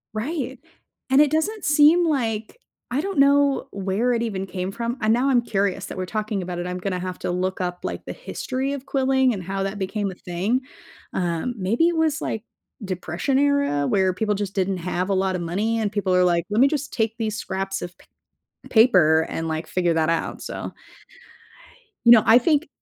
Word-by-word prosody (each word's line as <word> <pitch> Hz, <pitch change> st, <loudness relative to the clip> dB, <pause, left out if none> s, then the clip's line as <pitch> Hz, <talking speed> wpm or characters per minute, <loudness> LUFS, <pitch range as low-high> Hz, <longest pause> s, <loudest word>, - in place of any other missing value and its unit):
Right, 265 Hz, +2 st, -3 dB, 0.5 s
and 265 Hz, +1 st, +5 dB
it 300 Hz, -, +4 dB
doesn't 370 Hz, +8 st, -1 dB
seem 300 Hz, +4 st, +5 dB
like 225 Hz, -, -2 dB, 0.3 s
I 255 Hz, +4 st, 0 dB
don't 390 Hz, -3 st, -3 dB
know 280 Hz, 0 st, +4 dB
where 200 Hz, +5 st, 0 dB
it 235 Hz, -1 st, 0 dB
even 195 Hz, -4 st, -3 dB
came 185 Hz, 0 st, -4 dB
from, 235 Hz, +4 st, -3 dB
and 215 Hz, 0 st, +2 dB
now 250 Hz, +4 st, +2 dB
I'm 250 Hz, -3 st, +4 dB
curious 200 Hz, -4 st, -1 dB
that -, -, -8 dB
we're 185 Hz, -, -2 dB
talking 215 Hz, +1 st, -3 dB
about 180 Hz, -1 st, -5 dB
it, 175 Hz, -, -3 dB
I'm 180 Hz, 0 st, -3 dB
gonna 185 Hz, 0 st, -3 dB
have 185 Hz, 0 st, -5 dB
to -, -, -2 dB
look 185 Hz, +1 st, -2 dB
up, 180 Hz, -1 st, -3 dB
like, -, -, -5 dB
the -, -, -5 dB
history 270 Hz, -, -4 dB
of 280 Hz, -1 st, -5 dB
quilling, 265 Hz, -2 st, +2 dB
and 190 Hz, -4 st, -5 dB
how 195 Hz, +2 st, -3 dB
that 195 Hz, +1 st, -3 dB
became 200 Hz, +1 st, -2 dB
a 185 Hz, -, -8 dB
thing. 185 Hz, +9 st, -1 dB, 0.5 s
Um, 175 Hz, +7 st, -1 dB
maybe 225 Hz, -, +2 dB
it 340 Hz, -, -2 dB
was, 320 Hz, -1 st, +1 dB
like, 220 Hz, -, -3 dB, 0.4 s
Depression 185 Hz, -, -2 dB
era 280 Hz, -, +2 dB
where 190 Hz, -2 st, +2 dB
people 210 Hz, +2 st, -1 dB
just 200 Hz, -1 st, -4 dB
didn't 190 Hz, -1 st, 0 dB
have 180 Hz, +1 st, -2 dB
a -, -, +2 dB
lotta 190 Hz, -1 st, 0 dB
money 205 Hz, +7 st, -1 dB
and 215 Hz, -2 st, 0 dB
people 200 Hz, -3 st, 0 dB
are 180 Hz, -, +4 dB
like, 170 Hz, -1 st, +2 dB
"Let 210 Hz, +2 st, 0 dB
me 270 Hz, -, +7 dB
just 285 Hz, -1 st, -3 dB
take 225 Hz, -1 st, 0 dB
these 220 Hz, -2 st, -2 dB
scraps 195 Hz, -2 st, -3 dB
of 175 Hz, +1 st, -7 dB
pa -, -, -21 dB, 0.7 s
paper 175 Hz, -9 st, +5 dB
and, 165 Hz, -, -3 dB
like, 160 Hz, 0 st, -3 dB
figure 175 Hz, 0 st, 0 dB
that 160 Hz, -1 st, +1 dB
out." 165 Hz, -, -2 dB
So -, -, -6 dB, 1.3 s
you 235 Hz, -, +7 dB
know, 225 Hz, -3 st, +8 dB
I 225 Hz, -, +8 dB
think 300 Hz, +4 st, +1 dB
210 Hz, 205 wpm, -23 LUFS, 185-265 Hz, 1.3 s, know